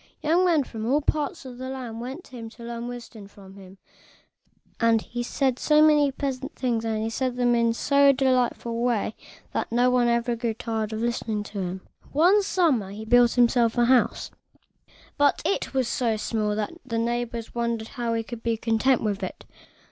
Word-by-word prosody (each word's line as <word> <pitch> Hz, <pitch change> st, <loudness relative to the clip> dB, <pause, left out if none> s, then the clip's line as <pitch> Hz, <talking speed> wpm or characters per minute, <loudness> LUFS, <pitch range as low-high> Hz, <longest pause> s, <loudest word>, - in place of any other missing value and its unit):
Young 335 Hz, +4 st, +3 dB
men 325 Hz, -5 st, +3 dB
from 225 Hz, -3 st, -6 dB
all 280 Hz, +4 st, +3 dB
parts 295 Hz, -2 st, -2 dB
of 250 Hz, -1 st, -9 dB
the 260 Hz, 0 st, -5 dB
land 245 Hz, -4 st, -6 dB
went 265 Hz, +8 st, -6 dB
to -, -, -19 dB
him 230 Hz, -2 st, -7 dB
to 235 Hz, -, -14 dB
learn 235 Hz, 0 st, -5 dB
wisdom 235 Hz, -4 st, -9 dB
from 195 Hz, -1 st, -15 dB
him; 195 Hz, -1 st, -14 dB, 1.0 s
and 230 Hz, -1 st, +4 dB
he 240 Hz, +2 st, -6 dB
said 260 Hz, +1 st, -1 dB
so 300 Hz, -1 st, +3 dB
many 300 Hz, -2 st, +5 dB
pleasant 270 Hz, 0 st, -4 dB
things, 235 Hz, -3 st, -1 dB
and 225 Hz, 0 st, -2 dB
said 255 Hz, -1 st, -1 dB
them 245 Hz, -1 st, +2 dB
in 235 Hz, -1 st, +3 dB
so 280 Hz, +4 st, +4 dB
delightful 255 Hz, -3 st, +1 dB
a 230 Hz, 0 st, -2 dB
way, 235 Hz, -3 st, 0 dB, 0.4 s
that -, -, -2 dB
no 245 Hz, +2 st, +3 dB
one 250 Hz, -1 st, +3 dB
ever 235 Hz, 0 st, +1 dB
grew 230 Hz, -1 st, -2 dB
tired 220 Hz, -1 st, -3 dB
of 220 Hz, 0 st, -4 dB
listening 230 Hz, -3 st, -2 dB
to 205 Hz, -1 st, -7 dB
him. 185 Hz, +1 st, -4 dB, 0.3 s
One 360 Hz, +8 st, +4 dB
summer 320 Hz, -, +1 dB
he 210 Hz, +2 st, -8 dB
built 240 Hz, +1 st, +5 dB
himself 240 Hz, -1 st, +3 dB
a 240 Hz, -, +4 dB
house, 250 Hz, 0 st, +2 dB, 0.9 s
but 285 Hz, -1 st, +3 dB
it 395 Hz, -, -1 dB
was 260 Hz, -3 st, 0 dB
so 235 Hz, -3 st, 0 dB
small 210 Hz, -1 st, -1 dB
that 210 Hz, -1 st, -2 dB, 0.2 s
his 230 Hz, -1 st, -1 dB
neighbors 235 Hz, 0 st, -3 dB
wondered 235 Hz, -2 st, -2 dB
how 235 Hz, -2 st, -2 dB
he 225 Hz, -, -1 dB
could 230 Hz, 0 st, -8 dB
be 230 Hz, -1 st, -1 dB
content 230 Hz, +3 st, +1 dB
with 205 Hz, -2 st, -1 dB
it. 185 Hz, -, -6 dB
235 Hz, 195 wpm, -25 LUFS, 225-260 Hz, 1.0 s, many